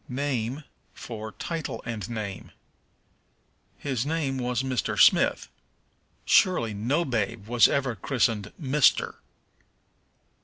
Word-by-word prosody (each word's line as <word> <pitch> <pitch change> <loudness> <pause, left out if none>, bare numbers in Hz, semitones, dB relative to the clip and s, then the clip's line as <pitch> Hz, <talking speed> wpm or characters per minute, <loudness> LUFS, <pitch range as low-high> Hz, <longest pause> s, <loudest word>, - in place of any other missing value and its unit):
Name 130 0 -2 0.3
for 110 -2 -7
Title 165 -2 -4
and 115 -3 -5
Name. 105 -4 -6 1.3
"His 130 -5 -2
name 145 -3 -1
was 125 +1 -1
Mr. 130 -2 -1
Smith." - - +4 0.8
Surely 120 - +3
no 125 +12 0
babe 115 -4 -2
was 120 0 +5
ever 135 -4 0
christened 110 -2 0
Mister. 145 -2 +2
125 Hz, 100 wpm, -26 LUFS, 110-140 Hz, 1.3 s, was